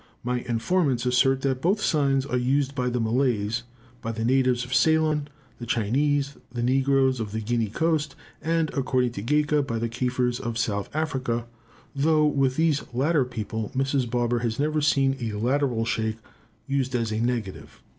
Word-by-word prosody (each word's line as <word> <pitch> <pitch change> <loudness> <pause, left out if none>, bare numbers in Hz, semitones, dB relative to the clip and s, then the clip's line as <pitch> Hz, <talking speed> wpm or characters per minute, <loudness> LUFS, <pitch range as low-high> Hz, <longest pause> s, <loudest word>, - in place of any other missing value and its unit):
My 125 0 -1
informants 125 +2 0
assert 130 +2 +3
that 130 -2 -1
both 190 +7 +2
signs 140 -7 +1
are 125 - -2
used 135 +3 +1
by 125 -2 -1
the 125 0 -1
Malays, 115 -2 0 0.4
by 115 - -3
the 115 0 -3
natives 125 -1 +2
of 125 - -6
Ceylon, 155 +1 +3 0.3
the 120 - -7
Chinese, 140 +6 0
the 120 -1 -3
negroes 130 0 +2
of 110 -2 -4
the 110 - -1
Guinea 115 +1 0
coast, 155 +2 0 0.3
and, 165 -1 0
according 130 -3 +1
to 110 - -6
Gaika, 150 +5 +2
by 120 -5 -3
the 115 +1 -2
Kafirs 125 +1 -1
of 115 -1 -4
South 105 -4 -1
Africa, 130 -7 -1 0.5
though 155 +2 +3
with 135 -3 +2
these 160 -2 +2
latter 145 +3 +2
people 110 -3 -4
Mrs. 135 -2 0
Barber 120 0 0
has 115 -1 -2
never 155 +1 0
seen 135 -2 +2
a 115 -3 -3
lateral 125 0 +1
shake 110 -1 -1 0.5
used 135 -2 -1
as 115 -2 -1
a 110 - -1
negative. 115 -5 -3
130 Hz, 170 wpm, -25 LUFS, 120-140 Hz, 0.5 s, assert